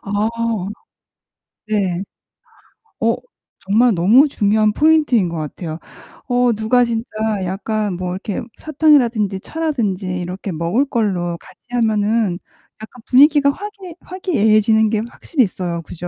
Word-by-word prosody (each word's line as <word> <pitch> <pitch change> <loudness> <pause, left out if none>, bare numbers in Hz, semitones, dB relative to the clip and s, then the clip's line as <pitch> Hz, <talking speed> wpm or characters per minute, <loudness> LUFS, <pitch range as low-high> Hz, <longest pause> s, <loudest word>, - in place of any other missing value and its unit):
아. 205 +2 0 1.4
네. 195 -5 0 1.0
어, - - +2 0.4
정말 225 +5 +3
너무 220 - +5
중요한 215 -4 +1
포인트인 300 - +3
것 170 - -5
같아요. 155 +1 -6 0.5
어 245 -1 +2
누가 220 +4 +2
진짜 230 0 -3 0.4
약간 205 +2 -2
뭐 180 0 -4
이렇게 190 +2 -4 0.2
사탕이라든지 250 -10 +2
차라든지 230 - -2
이렇게 185 +3 -5
먹을 170 - 0
걸로 185 -8 -1
같이 - - -18
하면은 220 -4 +1 0.4
약간 235 +2 -11
분위기가 285 +2 +5
화기애 395 +1 -9
화기애애지는 220 - +2
게 215 -1 0
확실히 275 0 0
있어요. 175 -4 -3
그죠? 175 +2 -8
215 Hz, 280 characters per minute, -18 LUFS, 190-250 Hz, 1.4 s, 너무